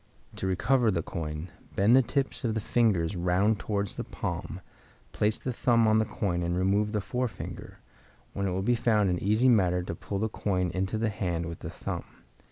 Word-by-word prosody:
To 95 - -2
recover 115 +6 +2
the 85 -5 0
coin, 80 +1 -5 0.2
bend 105 +5 +5
the 135 - +7
tips 135 +3 -2
of 115 -3 0
the - - +1
fingers 105 -6 +1
round 90 +5 +2
towards 100 -2 -2
the - - -2
palm, - - -5 0.5
place 105 +1 +1
the 130 - -4
thumb 120 -2 +3
on 110 0 +4
the 110 - +2
coin 90 -5 -2
and 85 +1 -1
remove 100 +3 +2
the 105 -1 0
forefinger, 120 0 -4 0.6
when 100 0 -1
it - - -1
will 95 +1 -1
be 120 - +3
found 110 -5 +2
an 90 - -1
easy 110 +6 +3
matter 90 -7 +3
to 90 - -4
pull 100 +4 -5
the 110 +3 0
coin 95 -4 -1
into 95 +4 -1
the 110 0 +1
hand 90 -5 -2
with 85 -1 -6
the - - -6
thumb. - - -5
100 Hz, 200 wpm, -28 LUFS, 90-110 Hz, 0.6 s, the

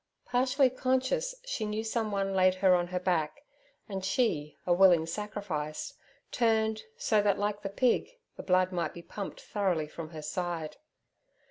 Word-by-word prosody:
Partially 255 +1 +3
conscious, 260 - 0
she - - -3
knew 215 +1 -2
someone 210 -4 -1
laid 185 -1 +4
her 185 0 +4
on 175 -1 +2
her 180 0 -2
back, 180 - -1 0.4
and 195 -3 -4
she, 180 - 0
a 175 - +3
willing 175 -3 +6
sacrifice, 165 -5 -4 0.4
turned, 220 -2 +2 0.2
so 220 - +2
that, 205 -1 +2
like 205 0 -1
the 195 - -3
pig, 245 - +2 0.3
the - - -7
blood 185 0 +2
might 175 -2 -2
be 170 - -9
pumped 200 +2 -6
thoroughly 185 -7 -1
from 155 +1 -8
her 155 -2 -8
side. 170 -1 -3
195 Hz, 155 wpm, -30 LUFS, 175-220 Hz, 0.4 s, willing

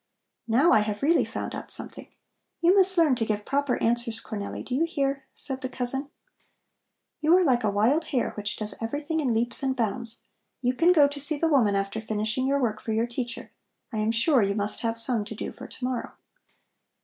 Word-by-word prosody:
"Now 265 +10 +4
I - - +6
have 210 +2 -3
really 330 +4 +4
found - - -5
out - - -7
something! - - 0 0.5
You 345 +2 +4
must 380 -1 +6
learn 320 -5 +4
to 230 - 0
give 210 -2 -2
proper 280 -2 0
answers, 235 -1 0
Cornelli, 205 -2 -6
do 250 - -6
you 280 +6 +2
hear?" 275 -4 -2
said 265 -1 -3
the 260 - -4
cousin. 265 +3 -2 1.1
"You 315 +4 +4
are 370 - +3
like 250 -6 +2
a 210 - +2
wild 235 +11 +2
hare 255 -6 -1
which 210 0 -4
does 215 -1 -2
everything 290 +8 -3
in 270 -5 0
leaps 235 +1 +1
and 265 -1 -1
bounds. 230 -1 -2 0.4
You 250 -1 0
can 335 +7 +4
go 300 -5 +6
to 285 0 -6
see 290 +2 +2
the 330 - +1
woman 235 -9 +3
after 195 +2 -2
finishing 220 +4 -2
your 280 +1 +2
work 220 -5 -1
for 220 - -3
your 225 +2 +1
teacher. 240 0 -6 0.4
I 215 - -2
am 215 +1 0
sure 235 +4 +3
you 200 0 0
must 205 0 -2
have 230 -1 -2
some 230 -1 +3
to 220 - -8
do - - -5
for - - -11
to - - -12
morrow." 250 -1 -4
245 Hz, 210 wpm, -26 LUFS, 220-285 Hz, 1.1 s, I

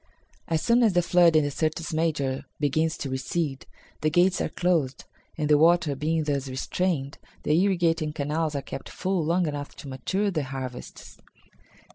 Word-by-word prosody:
As 160 -1 0
soon 235 +1 +4
as 220 -5 +4
the 175 0 +3
flood 170 -1 +4
in 155 - +5
the 145 - -1
Syrtis 160 +2 -2
Major 145 -5 -1
begins 155 +3 +1
to 140 - -4
recede, 135 +2 -3 0.3
the 155 - +2
gates 175 +4 +3
are - - -1
closed, 165 -7 0 0.3
and, 150 -2 -1
the 150 -1 +5
water 165 -2 +4
being 155 +3 0
thus 140 -2 -1
restrained, 140 +2 -2 0.2
the 150 - +1
irrigating 170 -5 +1
canals 150 +1 -2
are 140 - -2
kept - - -7
full 185 -2 -1
long 170 +3 +1
enough 145 -2 -5
to - - -10
mature 190 +10 -1
the 155 -6 -2
harvests." 130 -2 -8
155 Hz, 170 wpm, -26 LUFS, 140-175 Hz, 0.3 s, in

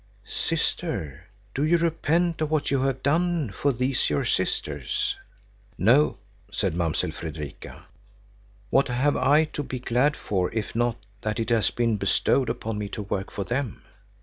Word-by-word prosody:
"Sister, 70 -4 -2 0.3
do 140 - 0
you 165 +3 +4
repent 165 0 +1
of 155 - +1
what 155 -3 +1
you 135 -2 +2
have 135 -1 0
done 165 - +2
for 140 +9 +1
these 130 +1 0
your 75 -1 +1
sisters?" 70 -4 -1 0.6
"No," 125 - +4 0.3
said - - 0
Mamsell 85 -2 0
Fredrika. 75 -3 -7 0.9
"What 135 - +4
have 130 +3 +2
I 145 +4 +5
to - - -2
be 130 -2 -4
glad 125 +4 +2
for 95 -3 -1
if 110 -2 -2
not 120 0 +1 0.2
that 110 +1 -2
it 115 +1 -1
has 115 -2 +3
been 115 -3 +1
bestowed 125 +4 +2
upon 115 -2 -3
me 105 -1 -3
to 105 - -5
work 95 -1 -3
for 100 - -3
them? 125 0 -3
125 Hz, 155 wpm, -26 LUFS, 105-145 Hz, 0.9 s, I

